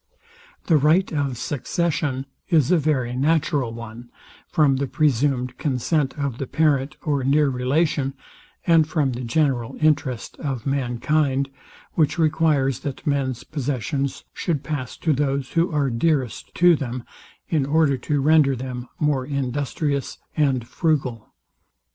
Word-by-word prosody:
The 160 - +4
right 160 +6 +3
of 140 -4 -1
succession 145 0 -1 0.2
is 155 -6 +3
a 180 - +5
very 130 -5 0
natural 145 -2 +1
one, 115 +1 -9 0.4
from 150 -6 +3
the 140 +1 -1
presumed 130 -3 +1
consent 145 +1 0
of 140 -4 -3
the 135 - -3
parent 145 -2 +1
or 145 -4 0
near 145 +2 +3
relation, 135 +2 0 0.5
and 165 -2 +5
from 155 -4 +1
the 125 0 -5
general 125 -1 0
interest 140 -6 0
of 135 -6 -3
mankind, 135 +1 0 0.4
which 150 -3 +2
requires, 155 -4 +2
that 140 +2 -6
men's 135 -4 -1
possessions 140 -1 -3
should 160 -6 -2
pass 145 -5 -4
to 160 - +1
those, 140 -1 -1
who 170 +2 +1
are 145 -4 +1
dearest 130 -1 -1
to 175 -1 +6
them, 125 -4 -4 0.4
in 155 -4 +1
order 150 -2 +3
to 145 +3 -1
render 150 -2 +4
them 125 0 -6
more 150 -4 +1
industrious 140 +1 -2 0.2
and 135 -6 +1
frugal. 135 -9 -1
140 Hz, 135 wpm, -23 LUFS, 130-155 Hz, 0.5 s, to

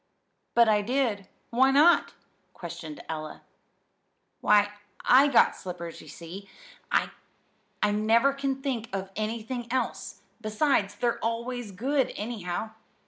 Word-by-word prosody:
"But 235 -1 +6
I 210 -1 +4
did. 225 -4 -1 0.2
Why 260 +3 +4
not?" 300 +6 +4 0.4
questioned 300 -2 -8
Ella. 155 -1 -6 1.0
"Why, 205 0 +4 0.3
I 270 +3 +7
got 270 -5 +4
slippers, 175 -2 -7
you - - -14
see. 175 +6 -10 0.4
I - - +2 0.8
never 225 +6 +3
can 275 -1 -3
think 235 -5 -2
of 195 0 -4
anything 230 +3 -4
else. 260 0 -3 0.2
Besides, 215 -2 +1
they're 235 +2 0
always 235 0 -3
good, 265 +8 0
anyhow. 210 -2 -4
225 Hz, 115 wpm, -27 LUFS, 205-260 Hz, 1.0 s, I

